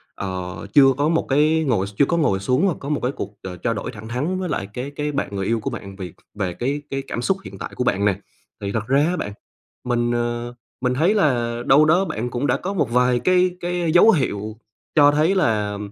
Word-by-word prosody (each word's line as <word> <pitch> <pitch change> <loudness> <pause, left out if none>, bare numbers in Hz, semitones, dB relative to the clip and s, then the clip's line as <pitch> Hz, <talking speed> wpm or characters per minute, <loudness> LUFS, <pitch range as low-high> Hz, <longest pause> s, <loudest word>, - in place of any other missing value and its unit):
ờ, 95 -1 -5
chưa 140 -2 +8
có 145 +2 +2
một 165 0 +1
cái 155 +3 +3
ngồi 100 -6 +1
x 105 - -11
chưa 140 - +5
có 170 - 0
ngồi 100 -12 +2
xuống 130 - +1
và 175 - +1
có 140 - -6
một 150 - 0
cái 125 - +1
cuộc, - - -6
ờ, 90 -1 -6
trao 115 +5 -1
đổi 120 +4 -5
thẳng 110 -1 -10
thắn 145 +11 -2
với 185 -3 -3
lại 95 - -2
cái 130 +3 -5
cái 150 0 -2
bạn 135 -7 -3
người 95 - -2
yêu 115 +2 +1
của 105 - -3
bạn 100 0 -8
về 95 -4 -7 0.2
về 95 -4 -3
cái 140 +8 -2
cái 135 0 -2
cảm 120 - -3
xúc 195 +9 +1
hiện - - -9
tại - - -6
của - - -1
bạn 100 -4 +1
nè. 100 -1 +1 0.4
Thì 100 - -3
thật 110 +1 -3
ra 140 +2 +3
á 175 - 0
bạn, 105 - -4 0.5
mình, 120 -1 0
ờ, 120 0 -2 0.3
mình 125 0 +1
thấy 165 +10 +2
là 120 - +1
đâu 150 +3 +6
đó 180 +5 +3
bạn 120 - -3
cũng 125 +4 -2
đã - - +2
có 195 +2 -4
một 160 -10 0
vài 125 0 +3
cái 180 +6 +3
cái 175 -2 -1
dấu 220 +6 +7
hiệu 110 - -2 0.4
cho 145 -2 +7
thấy 155 +6 +2
là, 105 - +1
125 Hz, 250 wpm, -22 LUFS, 110-155 Hz, 0.5 s, chưa